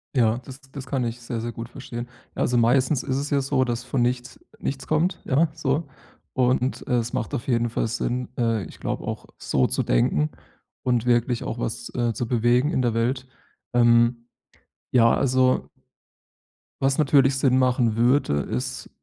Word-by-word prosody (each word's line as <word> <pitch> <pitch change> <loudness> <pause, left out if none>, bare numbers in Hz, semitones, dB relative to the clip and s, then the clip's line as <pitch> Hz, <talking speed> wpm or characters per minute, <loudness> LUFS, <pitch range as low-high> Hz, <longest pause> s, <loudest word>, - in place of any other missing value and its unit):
Ja, 115 -2 +3
das 135 +1 -10
das 135 -2 -7
kann 130 -1 -1
ich 115 +1 -4
sehr, 115 -1 -4
sehr 120 - -3
gut 115 +1 -7
verstehen. 120 0 -7 0.3
Also, 125 - 0
meistens 125 +3 +3
ist 130 - -2
es 145 +2 -3
ja 140 -1 +3
so, 135 -1 +1
dass 120 0 -2
von 130 0 -1
nichts 125 +1 -1 0.2
nichts 135 0 -4
kommt, 170 +4 +1
ja, 155 +5 +3
so. 150 0 -1 0.5
Und, 130 0 +1
es 120 -2 0
macht - - -2
auf 120 - -5
jeden 120 -2 +1
Fall 115 - -1
Sinn, 125 +2 -2
äh, 115 -3 +1
ich - - -13
glaube - - -3
auch - - -5
so 65 - +1
zu - - -1
denken 75 +5 +2 0.5
und 125 -2 +1
wirklich 120 0 +2
auch - - -4
was, - - -4
äh, 120 -2 +1
zu 120 - -3
bewegen 120 +4 +2
in 130 - +1
der 120 -2 +1
Welt. 125 +3 0 0.5
Ähm, 120 0 +4 0.7
ja, 115 -2 +5
also 130 -1 +2 1.1
was 135 0 +2
natürlich 135 -2 +4
Sinn 130 -1 +3
machen 125 -3 +2
würde, 120 - +3
ist, 65 - -4
125 Hz, 175 wpm, -24 LUFS, 115-135 Hz, 1.1 s, ja